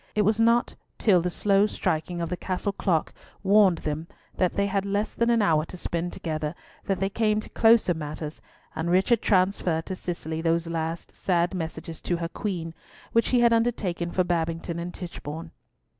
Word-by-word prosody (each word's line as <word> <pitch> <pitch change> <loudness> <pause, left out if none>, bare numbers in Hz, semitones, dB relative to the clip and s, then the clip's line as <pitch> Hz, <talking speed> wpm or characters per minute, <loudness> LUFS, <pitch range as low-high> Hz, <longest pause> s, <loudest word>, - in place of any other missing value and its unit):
It 210 - +3
was 215 +2 +2
not 230 +1 +3 0.2
till 190 -6 +4
the 180 - -1
slow 200 +3 +3
striking 170 -2 -2
of 170 - -2
the 180 - -1
Castle 185 +2 -2
clock 180 -5 0 0.3
warned 195 -3 +5
them 155 +2 -2 0.3
that 185 -2 +1
they 200 - +2
had 195 -1 0
less 205 +2 -1
than 235 0 +1
an 230 -2 +4
hour 155 -5 +3
to 180 - -9
spend 170 0 -2
together 155 -1 -3 0.3
that 195 -2 0
they 195 - +1
came 215 +1 +1
to - - -8
closer 225 -5 +5
matters, 155 -1 -6 0.3
and 160 +2 -2
Richard 195 +6 +3
transferred 185 -4 +2
to 190 - -4
Cicely 160 -3 -4
those 165 0 +1
last 165 0 -4
sad 175 0 +1
messages 160 -2 -5
to 175 - -1
her 170 0 -3
Queen, 175 -5 -4 0.4
which 230 - +3
he 250 -2 +3
had 235 -1 +5
undertaken 215 -7 0
for 185 +1 +1
Babington 170 -1 -2
and 175 +1 -4
Tichborne. 165 -3 -7
180 Hz, 185 wpm, -26 LUFS, 165-200 Hz, 0.4 s, warned